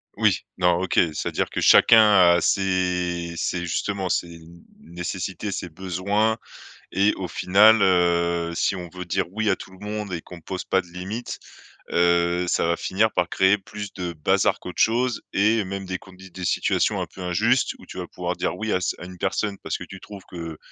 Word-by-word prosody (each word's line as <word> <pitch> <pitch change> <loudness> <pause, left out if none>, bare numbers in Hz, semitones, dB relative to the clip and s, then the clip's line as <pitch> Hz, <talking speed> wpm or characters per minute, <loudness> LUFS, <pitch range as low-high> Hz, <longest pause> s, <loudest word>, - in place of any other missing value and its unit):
Oui, - - +2 0.2
non, 90 -1 +3
OK. 95 - -2 0.2
C'est-à-dire - - -2
que - - -3
chacun 110 -1 +7 0.3
a 85 - +2
ses 90 -3 0
ses 90 +1 -1
justement, 95 +3 -2
ses 85 - 0
n 85 +1 -15 0.2
nécessités, 90 +4 -5
ses 90 - -4
besoins 95 +6 -1 0.6
et 100 +3 +3
au 95 - -4
final, 100 +6 +5
heu, 85 -2 +2
si 95 - 0
on 90 -1 -7
veut 90 0 -6
dire 85 - 0
oui 110 0 0
à 95 - +2
tout - - -11
le 95 +2 -12
monde 105 -2 -4
et 85 - -3
qu'on 90 -2 -12
pose 95 +2 -5
pas 95 -1 +1
de - - -18
limites, 95 +7 -6 0.5
heu, 85 +1 +2
ça - - +1
va 85 - +2
finir 110 +4 +1
par 90 -1 0
créer 95 +3 +3
plus 100 +1 -8
de 90 -3 -4
bazar 75 -2 +1
qu'autre 90 - -7
chose 120 +1 +2
et 105 +2 +2
même 95 +1 -5
des 95 0 -4
condi 95 0 -15
des 95 0 -7
situations - - +1
un - - -2
peu 95 - -9
injustes, 110 +9 +1
où - - -14
tu - - -9
vas - - -4
pouvoir - - -4
dire - - -2
oui 110 0 -2
à 90 - +1
ce - - -1
à 90 - -7
une 90 -1 -11
personne 100 +2 -1
parce - - -2
que - - -7
tu 95 - -10
trouves 100 -1 -11
que, 85 -2 -7
95 Hz, 205 wpm, -24 LUFS, 85-100 Hz, 0.6 s, chacun